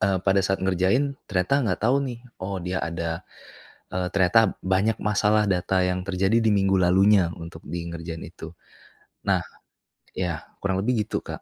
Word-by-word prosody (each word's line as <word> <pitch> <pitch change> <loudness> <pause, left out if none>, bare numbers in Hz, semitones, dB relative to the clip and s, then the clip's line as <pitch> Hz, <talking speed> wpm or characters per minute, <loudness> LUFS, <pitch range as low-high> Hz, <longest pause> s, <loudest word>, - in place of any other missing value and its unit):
eee, 95 -1 +2
pada 95 0 +4
saat 95 +1 0
ngerjain 95 +10 +2 0.2
ternyata 90 +5 +1
nggak 90 - -1
tahu 125 +5 +4
nih, 120 -1 -6 0.2
oh 95 +1 -3
dia 90 +1 -2
ada, 85 +1 -3 0.7
eee, 90 0 -1
ternyata 100 +2 +4
banyak 95 +4 +1
masalah 105 0 +2
data 95 0 +1
yang 90 0 -1
terjadi 95 +4 +2
di 110 -1 +2
minggu 95 -1 +3
lalunya 95 0 +4
untuk 85 -1 -10
di 85 -1 -4
ngerjain 85 -1 -6
itu, 85 0 -10 0.7
nah - - +2 0.8
ya 85 -3 -2 0.2
kurang 95 -1 0
lebih 110 -1 +1
gitu, - - -2
Kak. - - -8
95 Hz, 165 wpm, -25 LUFS, 90-105 Hz, 0.8 s, pada